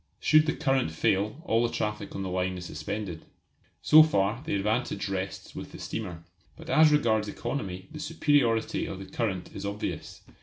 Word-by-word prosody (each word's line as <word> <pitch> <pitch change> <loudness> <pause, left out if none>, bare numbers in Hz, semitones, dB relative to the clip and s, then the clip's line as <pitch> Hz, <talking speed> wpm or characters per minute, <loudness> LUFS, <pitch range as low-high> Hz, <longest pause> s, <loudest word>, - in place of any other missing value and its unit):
Should 155 0 +5
the - - +2
current 135 - +1
fail 100 - 0
all 115 -6 +2
the 120 0 +1
traffic 105 0 -3
on 95 - -3
the 95 - -3
line 90 0 -1
is 90 - -7
suspended. 85 +2 -5 0.6
So 155 +1 +9
far 115 -6 +2
the 155 - -2
advantage 105 +5 -1
rests 95 0 -4
with - - -8
the - - -8
steamer. 90 -7 -5 0.3
But - - -7
as 155 0 +6
regards 110 -8 +2
economy 100 -5 -4
the 155 - -8
superiority 145 -7 +1
of 95 - -5
the 95 - -8
current 95 -6 -3
is 100 - -6
obvious. 100 +1 -5
105 Hz, 180 wpm, -28 LUFS, 95-135 Hz, 0.6 s, So